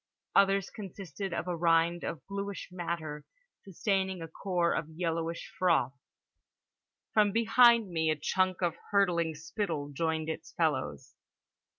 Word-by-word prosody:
Others 195 -1 +4
consisted 195 -2 -6
of 170 - -3
a 180 - -1
rind 170 +1 +2
of 155 -6 -5
blueish 200 0 -5
matter 165 -4 -4 0.4
sustaining 190 0 -1
a 165 - -6
core 175 +1 0
of 155 - -2
yellowish 165 0 -3
froth. 170 -8 +3 1.2
From 210 -2 +4
behind 230 -1 +5
me 160 -1 +1
a 155 - +2
chunk 185 +4 0
of 170 -2 +2 0.2
hurtling 175 -5 +2
spittle 160 -2 -3
joined 160 +1 -1
its 160 - -5
fellows. 130 - -1
170 Hz, 125 wpm, -31 LUFS, 160-195 Hz, 1.2 s, behind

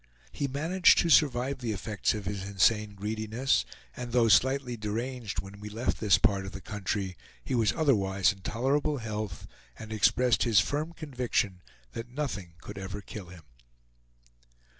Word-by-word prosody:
He 140 - -2
managed 165 +7 +4
to 170 - +3
survive 135 -2 +3
the 120 -4 -2
effects 105 +1 -1
of 105 -2 -5
his 100 +1 -3
insane 100 +2 +2
greediness, 110 +5 0 0.3
and 120 -1 -6
though 120 -2 +4
slightly 130 +1 +3
deranged 115 +1 -3
when 100 +1 -11
we 105 +1 -7
left 115 +4 -2
this 105 -3 +4
part 100 -4 +2
of - - -8
the 95 - -6
country, 95 -1 -3 0.3
he - - -4
was 115 -4 +3
otherwise 100 - +2
in 95 - -18
tolerable 140 +9 0
health, 105 - -5 0.3
and 110 0 -8
expressed 120 +3 +3
his 115 -6 +5
firm 150 - -1
conviction 125 - -2 0.3
that 115 +1 -7
nothing 105 - -4
could - - -8
ever 95 +1 -6
kill 100 -1 -9
him. 85 -2 -13
110 Hz, 160 wpm, -29 LUFS, 100-130 Hz, 0.3 s, his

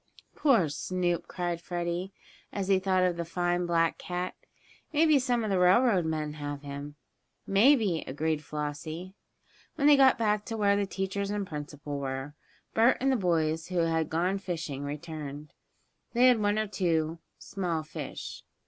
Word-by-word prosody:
"Poor 240 - +4
Snoop!" 175 +3 -2
cried 175 -2 -3
Freddie, 175 +2 -3 0.4
as 195 -1 -3
he 195 -1 +5
thought 185 -1 +2
of 180 -2 +1
the 170 - -1
fine 175 +1 -1
black 165 -1 +1
cat. 180 0 -3 0.6
"Maybe 310 -1 +4
some 245 -2 0
of 215 - -1
the 190 - +2
railroad 185 0 +4
men 155 -2 -2
have 145 -1 -6
him." 145 +1 -7 0.5
"Maybe," 205 - +4
agreed 155 +2 -1
Flossie. 155 +5 -5 0.6
When 285 - 0
they 295 0 +8
got 265 -1 +6
back 210 -2 +1
to 225 - -4
where 200 -1 +3
the 200 -1 0
teachers 195 +1 -3
and 205 -1 -2
principal 145 -2 -6
were, 135 +1 -4 0.4
Bert 230 +3 +4
and 270 +1 +2
the - - +3
boys 165 -5 0
who 180 - -4
bad 165 -1 0
gone 180 +4 0
fishing 165 -7 -4
had 145 - -4
returned. 150 -1 -7 0.6
They 245 +1 +5
had 245 -3 +4
one 205 0 +2
or 215 - +1
two 165 -5 0 0.2
small 175 -5 -3
fish. 155 - -7
175 Hz, 165 wpm, -29 LUFS, 155-200 Hz, 0.6 s, they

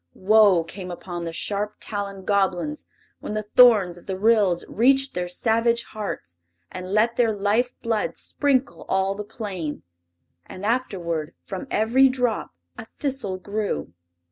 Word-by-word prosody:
Woe 200 -3 +5
came 180 +2 -8
upon 175 -1 -6
the 165 - -3
sharp 205 +4 -2
taloned 200 -2 -5
Goblins 200 - 0 0.3
when 210 - -5
the 215 - -1
thorns 210 -9 +6
of - - -22
the 190 -1 -3
Ryls 205 -4 +3
reached 270 +4 +2
their 180 0 -2
savage 230 +5 +1
hearts 145 - -7 0.3
and 185 0 -7
let 225 +3 +2
their 235 -2 +3
life 210 +4 +1
blood 225 -3 -1
sprinkle 275 -2 0
all 190 0 +1
the 210 +1 -6
plain. 190 -8 -5 0.6
And 190 +2 -8
afterward 175 -10 -2
from 190 -2 -6
every 245 +5 +4
drop 250 -3 -1 0.3
a - - -7
thistle 260 -7 -3
grew. 200 - -3
205 Hz, 145 wpm, -24 LUFS, 185-230 Hz, 0.6 s, thorns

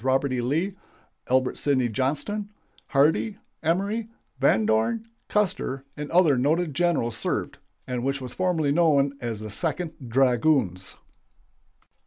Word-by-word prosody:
Robert 135 +1 +1
E. 125 - 0
Lee, 160 +11 0 0.6
Albert 130 0 +2
Sidney 130 -4 +2
Johnston, 150 - -2 0.4
Hardee, 160 +9 +2 0.2
Emory, 200 +7 0 0.3
Van 110 -5 +3
Dorn, 110 - +1 0.2
Custer, 165 -10 0
and 145 0 -5
other 165 -7 +4
noted 155 +4 +1
generals 145 -8 +1
served, - - -2 0.3
and 125 -2 -3
which 135 +1 0
was 125 -2 -6
formerly 175 -6 +1
known 145 -3 +3
as 115 -3 -3
the 110 -1 -6
Second 160 - -1 0.2
Dragoons. 120 - +2
140 Hz, 125 wpm, -25 LUFS, 125-170 Hz, 0.6 s, other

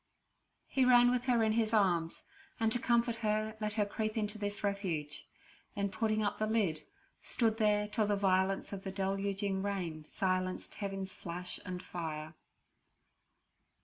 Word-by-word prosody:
He 265 - +2
ran 245 -1 +7
with 250 0 0
her 240 -3 +3
in 220 - +3
his 225 0 +2
arms, 175 -5 +2 0.4
and 225 -1 +2
to 245 - +2
comfort 235 -1 +2
her 215 0 0
let 210 -1 -1
her 210 -1 +1
creep 215 +2 -2
into 210 0 -1
this 205 0 -3
refuge; 180 -8 -2 0.5
then 200 -1 0
putting 215 0 0
up 205 - -1
the 215 - +1
lid, 200 -9 +1 0.4
stood 225 -2 +1
there 210 -1 +3
till 210 0 0
the 205 - +2
violence 190 0 +1
of 195 - -5
the 195 - -4
deluging 195 0 -1
rain 180 -6 -3
silenced 185 +1 -1
heaven's 195 -2 -4
flash 180 +1 -4
and 180 0 -4
fire. 155 -2 -5
205 Hz, 155 wpm, -33 LUFS, 190-220 Hz, 0.5 s, ran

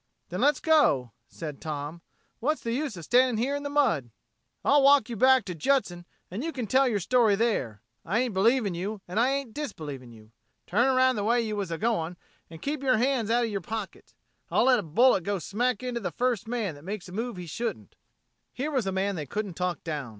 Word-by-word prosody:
"Then - - -3
let's 290 -1 +3
go," 215 - +3 0.2
said 150 +1 -8
Tom. 155 +2 -5 0.4
"What's 300 +6 0
the 230 - -2
use 270 -5 -2
of 170 - -8
standing 245 +6 +3
here 260 +5 0
in 285 - -3
the 285 - -4
mud?" 260 - +1 0.6
"I'll 285 0 +5
walk 275 -3 +5
you 235 - -4
back 260 0 +5
to 180 - -4
Judson, 175 - 0 0.2
an' 195 +6 -4
you 330 +3 -2
can 250 -6 -4
tell 265 +5 +3
yer 225 -4 +1
story 220 +2 +3
there. 135 - -1 0.2
I 195 +6 -1
ain't 245 -2 0
believing 215 +1 +2
you 195 +4 -4
and 180 +5 -2
I 245 +3 +4
ain't 275 -4 -2
disbelieving 145 - -6
you. 110 -1 -16 0.3
Turn 235 +8 +2
around 260 -1 +3
the 205 - -1
way 235 +3 +3
you 215 -1 -3
was 200 -3 -3
a 165 - -3
going, 180 -6 -1 0.3
an' 165 - -10
keep 285 - -3
yer 260 -4 +3
hands 245 -2 +1
out 240 +1 +3
of 225 - -4
yer 200 -1 -2
pockets. 215 +2 -7 0.3
I'll - - +3
let 255 -2 +5
a - - -1
bullet 190 +4 +3
go 200 +2 -1
smack 235 +6 -1
into 250 -2 -2
the 190 -6 -3
first 240 +4 -1
man 225 -7 -2
that 145 0 -14
makes 195 +1 -6
a - - -11
move 230 +2 -4
he 180 - -6
shouldn't." 150 - -5 0.6
Here 280 +5 -3
was 255 -8 0
a - - 0
man 195 +1 -1
they 150 -4 -5
couldn't 205 +3 -3
talk 180 -1 -3
down. 150 -6 -4
220 Hz, 225 wpm, -27 LUFS, 175-255 Hz, 0.6 s, I'll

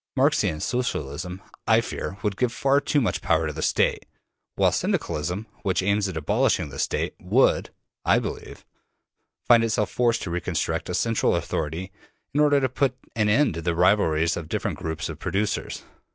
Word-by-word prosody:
Marxian 130 - +2
Socialism, 90 - -3 0.2
I 110 0 +5
fear, 110 -4 -4
would 105 -2 0
give 125 +2 0
far 140 +3 +2
too 145 - +1
much 115 - -1
power 80 0 +2
to 75 - -3
the 80 - -5
State, - - +1 0.5
while - - +3
Syndicalism, 90 +8 -1 0.2
which 95 -2 0
aims 100 0 +1
at 90 - -5
abolishing 100 - +1
the - - -8
State, - - -1
would, - - +2 0.3
I - - +4
believe, - - -5 0.8
find 115 -1 +6
itself 110 -2 0
forced 120 -1 +1
to 85 - -4
reconstruct 85 -1 -2
a - - -1
central 115 -1 +1
authority 85 +5 -3 0.4
in 145 - +1
order 145 -1 +5
to 130 - +1
put 130 +1 0 0.2
an 105 -2 +2
end 135 - +3
to 85 - -5
the 85 0 -1
rivalries 85 -3 +3
of 80 -2 -6
different - - -2
groups 80 0 -3
of 80 -2 -7
producers. 100 +3 -2
100 Hz, 170 wpm, -25 LUFS, 85-120 Hz, 0.8 s, find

